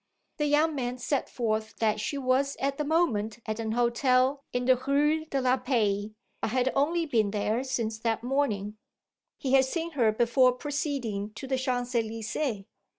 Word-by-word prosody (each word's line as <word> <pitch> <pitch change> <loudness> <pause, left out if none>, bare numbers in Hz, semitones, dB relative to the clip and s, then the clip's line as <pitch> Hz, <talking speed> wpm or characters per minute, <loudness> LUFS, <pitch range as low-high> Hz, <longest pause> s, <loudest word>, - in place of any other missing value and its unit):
The 295 - +1
young 305 +2 +3
man 250 -3 -3
set 270 +2 -1
forth 220 -2 -2
that 215 -1 +1
she 280 +7 -2
was 270 +1 +1
at 275 +1 -2
the - - +1
moment 250 -10 +1
at 215 0 -3
an 220 -1 -2
hotel 255 +3 +2
in 245 0 -1
the 255 0 +6
Rue 295 +5 +1
de 280 -4 -2
la 255 0 +2
Paix, 215 -6 0 0.3
but - - 0
had 255 +2 +1
only 330 +5 +2
been 225 -8 +1
there 215 +4 -1
since 230 -4 -2
that 225 0 -1
morning; 215 -6 -1 0.6
he 265 -1 -2
had 270 -1 +6
seen 330 +5 -3
her 240 -8 +3
before 240 +3 +3
proceeding 250 -7 -3
to 270 - -7
the 265 0 0
Champs 250 -1 -2
Elysées. 225 0 -2
255 Hz, 175 wpm, -28 LUFS, 220-275 Hz, 0.6 s, the